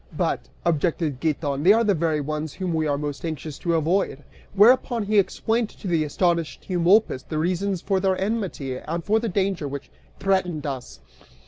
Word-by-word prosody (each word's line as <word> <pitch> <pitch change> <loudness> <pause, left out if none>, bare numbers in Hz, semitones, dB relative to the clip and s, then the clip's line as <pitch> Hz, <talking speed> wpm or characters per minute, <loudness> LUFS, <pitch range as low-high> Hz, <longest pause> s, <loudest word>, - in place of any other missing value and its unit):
"But," - - -1 0.2
objected 160 -3 0
Giton, 145 -3 -1
"they 185 +6 +7
are 230 +1 +3
the 210 -2 +3
very 160 -3 0
ones 155 +3 -4
we 165 -4 0
are 145 -1 +1
most 145 -1 -4
anxious 155 -3 -5
to 170 -1 0
avoid," 160 -3 0 0.3
whereupon 235 +2 +5
he 210 0 +3
explained 225 +3 0
to - - -9
the 165 -3 +2
astonished 170 +1 -1
Eumolpus 180 -4 +3
the 155 - -5
reasons 180 +3 -1
for 195 -2 +1
their 190 -1 +1
enmity 190 - -2
and 165 +5 -4
for 215 +2 +2
the 230 0 -2
danger 190 -5 0
which 140 0 -7 0.3
threatened 185 -6 0
us. 125 - -6
170 Hz, 170 wpm, -24 LUFS, 150-195 Hz, 0.3 s, they